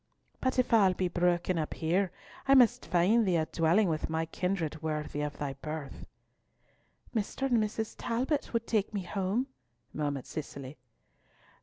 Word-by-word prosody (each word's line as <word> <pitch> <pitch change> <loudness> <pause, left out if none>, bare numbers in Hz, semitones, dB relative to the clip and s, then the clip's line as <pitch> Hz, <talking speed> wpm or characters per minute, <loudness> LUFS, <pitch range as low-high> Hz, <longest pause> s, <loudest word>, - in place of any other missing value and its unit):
But 260 0 0
if 250 -2 +2
all 195 -5 +5
be 185 - 0
broken 175 0 +1
up 155 - -3
here, 180 +3 +1 0.4
I 275 - +7
must 245 -1 +5
find 190 +7 +4
thee 185 -4 +2
a 160 -1 +2
dwelling 170 +6 +3
with 160 -2 -1
my 160 0 0
kindred 165 -2 -2
worthy 150 -2 -2
of 150 0 -3
thy 140 -2 -3
birth." 155 -2 -6 1.1
"Mr. 220 +4 -2
and 245 -4 +3
Mrs. 215 +1 -3
Talbot 255 +5 -1
would 230 -1 0
take 215 -2 0
me 195 - -1
home," 195 +6 -1 0.5
murmured 145 -3 -2
Cicely. 140 -2 -7
180 Hz, 155 wpm, -31 LUFS, 160-220 Hz, 1.1 s, I